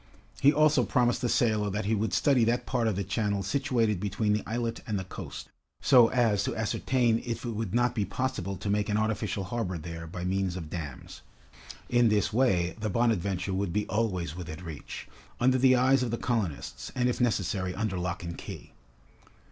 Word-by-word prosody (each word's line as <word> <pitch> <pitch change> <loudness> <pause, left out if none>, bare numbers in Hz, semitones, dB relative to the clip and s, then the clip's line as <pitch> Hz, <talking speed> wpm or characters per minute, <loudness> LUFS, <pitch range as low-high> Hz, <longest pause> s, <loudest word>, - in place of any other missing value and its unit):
He 140 - +7
also 155 0 +4
promised 120 -3 +1
the 120 - 0
sailor 110 -4 +2
that 105 +1 -2
he 110 - +1
would 110 +1 0
study 135 -5 +3
that 120 +2 0
part 120 -3 0
of 110 - 0
the 100 - -1
channel 100 0 -1
situated 115 -3 +1
between 105 +2 0
the 105 - +1
islet 115 0 -2
and 105 -3 -1
the 95 - -3
coast, 95 - -8 0.3
so 125 -4 +6
as 115 -5 +2
to - - -2
ascertain 115 +1 +1
if 115 0 -4
it 120 - -2
would 110 -2 -3
not 120 0 +2
be 110 -4 0
possible 100 -2 -2
to 100 - -6
make 105 +1 0
an 105 - +1
artificial 110 -2 -1
harbor 95 -3 -3
there 80 +1 -7
by 90 +2 -5
means 95 -1 0
of 80 -4 -7
dams. 75 -7 -7 0.7
In 120 -1 +4
this 105 0 +1
way, 95 -8 +2
the 110 0 -2
"Bonadventure" 100 -4 0
would 95 -1 -1
be 105 +1 0
always 95 -8 -1
within 85 -1 -7
reach, 80 -4 -8 0.3
under 130 +1 +3
the 130 0 +6
eyes 130 +1 +4
of 125 - -1
the 115 - -1
colonists, 110 - -3
and 125 0 +2
if 125 - -1
necessary, 95 -5 0
under 100 -3 -2
lock 90 0 -3
and 85 0 -5
key. - - -9
105 Hz, 195 wpm, -28 LUFS, 95-120 Hz, 0.7 s, He